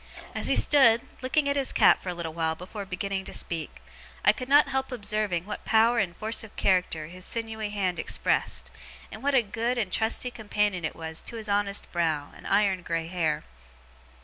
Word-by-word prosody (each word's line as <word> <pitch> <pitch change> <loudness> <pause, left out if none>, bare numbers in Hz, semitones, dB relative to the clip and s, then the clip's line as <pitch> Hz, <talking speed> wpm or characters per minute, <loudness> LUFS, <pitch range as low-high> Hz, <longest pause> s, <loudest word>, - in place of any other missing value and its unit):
As - - -3
he - - +2
stood, 240 -6 +5 0.2
looking 280 +3 +1
at 280 - +1
his 275 -2 +1
cap - - +5
for 185 - -5
a - - -1
little 165 -2 -4
while 160 -1 0
before 190 +4 -8
beginning 195 0 -3
to - - -7
speak, 165 -2 -4 0.4
I - - +7
could 255 -1 -6
not 285 0 +6
help 265 0 -1
observing 210 -6 -1
what 210 - -6
power 230 +2 +4
and 180 -5 -1
force 220 +1 -1
of 220 - -12
character 180 -5 +1
his 180 +3 -9
sinewy 220 -1 -3
hand 190 -4 -1
expressed, - - 0 0.4
and - - -8
what 280 0 +1
a 250 - +5
good 230 +4 -2
and 210 -6 -1
trusty 230 +2 +1
companion 210 -6 -1
it 155 - -3
was 160 0 -4
to - - -6
his 220 -2 -5
honest 200 0 0
brow 160 -4 -1
and - - -10
iron 195 -3 +2
grey 165 -1 -2
hair. 160 -3 -1
205 Hz, 200 wpm, -27 LUFS, 175-230 Hz, 0.4 s, I